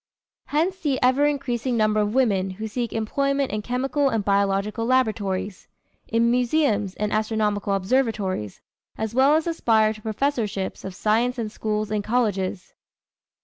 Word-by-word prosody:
Hence 345 +6 0
the 285 -6 0
ever 260 +3 +4
increasing 255 -4 -1
number 215 -1 +2
of 210 +2 0
women 200 -8 +2
who 220 +1 -4
seek 235 +2 -3
employment 275 +5 0
in 210 - -2
chemical 265 +4 0
and 220 -5 -1
biological 200 +2 +1
laboratories, 210 -6 0 0.4
in 230 +1 +2
museums 240 -6 +1
and 210 0 -2
astronomical 215 -2 0
observatories, 195 - -1 0.4
as 220 0 -3
well 270 +4 +5
as 315 - +1
aspire 225 -10 +2
to 215 - -13
professorships 220 -3 -2
of 190 -1 -7
science 230 +5 +1
in 225 -3 -3
schools 215 0 -3
and 210 -1 -1
colleges. 200 -5 -1
220 Hz, 145 wpm, -24 LUFS, 210-255 Hz, 0.4 s, well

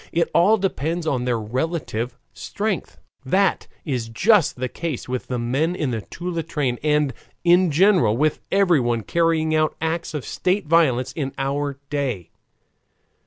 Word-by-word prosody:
It 170 0 0
all 195 +6 +5
depends 170 -4 -2
on 130 -5 0
their 120 -2 0
relative 125 0 -3 0.2
strength. 205 -3 -3 0.3
That 190 +9 +1 0.2
is 125 -7 -2
just 175 - +3
the 130 +1 -3
case 160 0 -5
with 125 0 -4
the 125 - -2
men 135 +9 0
in 150 -7 -1
the 115 -2 -2
Toula 175 - -4
train 145 -6 -2
and 150 -3 +2 0.3
in 175 +1 +5
general 160 - +4
with 155 +2 +1
everyone 140 - +2
carrying 165 - +1
out 155 0 +2
acts 160 0 -2
of 145 - -4
state 185 +1 -1
violence 145 -6 +3
in 135 -4 -3
our 140 +1 -2
day. 130 - -2
150 Hz, 150 wpm, -22 LUFS, 125-170 Hz, 0.3 s, all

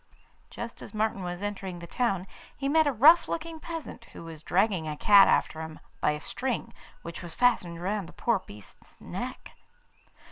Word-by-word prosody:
Just 235 0 -7
as - - -10
Martin 215 -2 0
was 175 +1 -5
entering 195 -3 -4
the 170 - -8
town 195 -1 -1 0.3
he 275 - -2
met 315 +2 +4
a - - +3
rough 300 +8 +7
looking 325 0 -4
peasant 320 -8 -7
who - - -11
was 165 -2 -9
dragging 185 -2 +1
a 150 -1 -4
cat 200 +2 +7
after 160 - +1
him 160 -1 -7 0.2
by - - +2
a 150 0 -1
string 250 +8 -3 0.3
which 170 0 -7
was 170 -2 -8
fastened 180 -9 +2
round 195 0 -2
the - - -14
poor 230 +3 +1
beast's 105 - -15
neck. - - -6
195 Hz, 180 wpm, -28 LUFS, 170-245 Hz, 0.3 s, rough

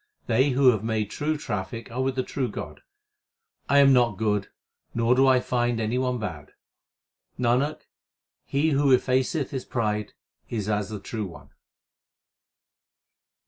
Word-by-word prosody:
They 130 +5 +3
who 130 0 +5
have 110 -3 -2
made 110 -2 -1
true 155 +1 -1
traffic 105 -3 -5
are 125 +3 -2
with 130 0 0
the 130 - 0
true 130 -1 -2
God. - - -7 0.9
I 140 - +4
am 140 -1 +7
not 120 -5 +3
good, 105 -2 0 0.5
nor 115 +1 +3
do 135 +1 +4
I 130 -1 +5
find 120 -2 0
any 115 +3 0
one 125 -1 0
bad. 80 -10 -6 0.8
Nanak, 125 +5 +1 0.6
he 150 +3 0
who 140 -2 +5
effaceth 130 +4 0
his 130 -2 -3
pride 105 -3 -2 0.4
is 105 -4 -3
as 105 -1 -1
the 105 -1 -5
True 105 +1 -4
One. 85 - -13
120 Hz, 145 wpm, -25 LUFS, 110-130 Hz, 0.9 s, am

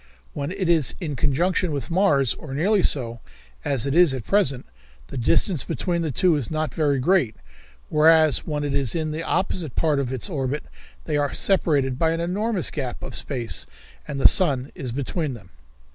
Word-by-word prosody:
When 140 0 -4
it 190 -1 -2
is 165 -5 +2
in 155 -6 -4
conjunction 165 +6 +1
with 145 +3 -4
Mars, 150 - +3
or 135 -3 -8
nearly 195 +7 +2
so, 120 -8 0 0.4
as 135 -4 0
it 140 - -1
is 170 -4 +5
at 125 - -5
present, 140 - +1 0.4
the - - -8
distance 150 - +2
between 175 -2 -2
the 160 - -1
two 175 +6 +3
is 140 -6 -3
not 155 -4 -2
very 145 -3 +1
great, 135 - +2 0.5
whereas 155 -1 +5
when 150 -2 -4
it 145 -1 -2
is 140 -2 0
in 155 -2 -1
the 155 +2 -4
opposite 170 -4 -2
part 155 -3 +1
of 130 -2 -2
its 130 -3 -2
orbit 145 -4 -3 0.4
they 150 -2 -1
are 145 -1 -1
separated 145 -9 +2
by 165 -1 +2
an 165 - -3
enormous 190 +3 -1
gap 130 -5 -5
of - - -6
space 120 -5 -3 0.4
and 145 -2 -4
the - - +8
sun 140 -8 +1
is 130 -4 -5
between 140 +2 -3
them." 95 -6 -15
150 Hz, 190 wpm, -23 LUFS, 135-170 Hz, 0.5 s, the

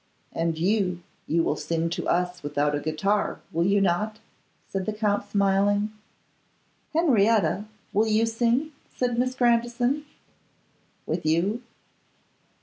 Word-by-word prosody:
'And 165 -1 -1
you, 180 -1 0 0.2
you 165 +1 +2
will - - +1
sing 165 0 -1
to - - -3
us 180 0 0
without 145 0 0
a 145 - 0
guitar, 160 +8 0
will 170 +2 +1
you 200 +1 +4
not?' 195 +3 0 0.5
said 195 0 -3
the 215 - 0
Count, 205 -1 0
smiling. 205 +1 +2 1.0
'Henrietta, 225 - +3 0.3
will 215 +2 +3
you 220 +1 +3
sing?' 235 +6 +1 0.2
said 245 -1 0
Miss 255 +1 0
Grandison. 240 +3 +1 1.0
'With - - -2
you. 175 +9 +1
205 Hz, 125 wpm, -26 LUFS, 175-230 Hz, 1.0 s, you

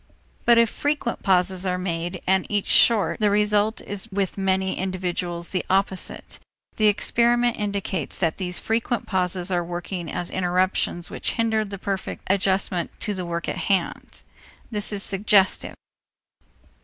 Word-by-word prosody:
But 235 -1 +6
if 230 0 +6
frequent 290 -5 -2
pauses 185 -1 +2
are 180 -1 0
made, 175 0 -3
and 190 0 +2
each 205 -2 0
short, 225 -4 +4
the 210 -1 +3
result 210 +1 +2
is 205 +2 -4
with 195 -1 -1
many 190 -1 0
individuals 180 -2 -3
the 185 - -1
opposite. 190 0 0 0.4
The 215 - +4
experiment 240 +3 +2
indicates 200 -6 -3
that 165 -3 0
these 180 -2 -1
frequent 230 +1 -1
pauses 180 -1 -1
are 175 -1 +1
working 175 0 -5
as 175 - -3
interruptions 180 -1 0
which - - -2
hinder 225 -2 +1
the 200 -1 -7
perfect 195 -1 -4
adjustment 190 -2 0
to 210 - -1
the 185 -3 -5
work 170 0 -3
in - - -2
hand. 190 -4 -2 0.5
That 210 -1 +1
is 205 -1 -1
suggestive. 195 0 +2
190 Hz, 145 wpm, -24 LUFS, 180-210 Hz, 0.5 s, But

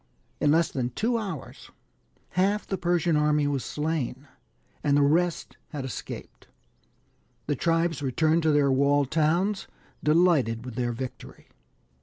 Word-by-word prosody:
In 150 - +2
less 165 +2 +3
than 125 -2 -2
two 230 - 0
hours 190 - -7 0.6
half 200 +3 +1
the 195 - -2
Persian 175 -2 +1
army 150 0 +2
was 140 -3 -1
slain, 150 -3 -3 0.6
and 145 -1 +3
the 145 - +4
rest 170 +4 +1
had 145 -4 -5
escaped. 130 - -8 1.0
The 145 - 0
tribes 165 +1 0
returned 155 +5 +2
to 160 -1 +2
their 145 -2 +3
walled 140 0 +2
towns, 175 +6 +1 0.4
delighted 150 -8 +3
with 125 - -7
their 120 +1 -1
victory. 125 +2 -8
150 Hz, 135 wpm, -26 LUFS, 140-170 Hz, 1.0 s, the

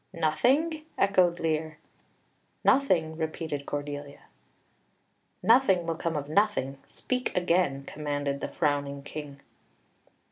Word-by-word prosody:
"Nothing!" 265 - +1
echoed 185 -3 +3
Lear. 155 -1 -1 0.9
"Nothing," 170 -13 +3
repeated 160 -3 -4
Cordelia. 145 0 -5 1.2
"Nothing 220 -7 +5
will 165 - 0
come 165 0 -3
of 145 -1 -3
nothing. 155 -7 +1
Speak 255 -5 -3
again," 175 -6 +2
commanded 145 -2 -3
the - - -2
frowning 140 -1 -1
King. 145 -1 -8
160 Hz, 100 wpm, -28 LUFS, 145-185 Hz, 1.2 s, Nothing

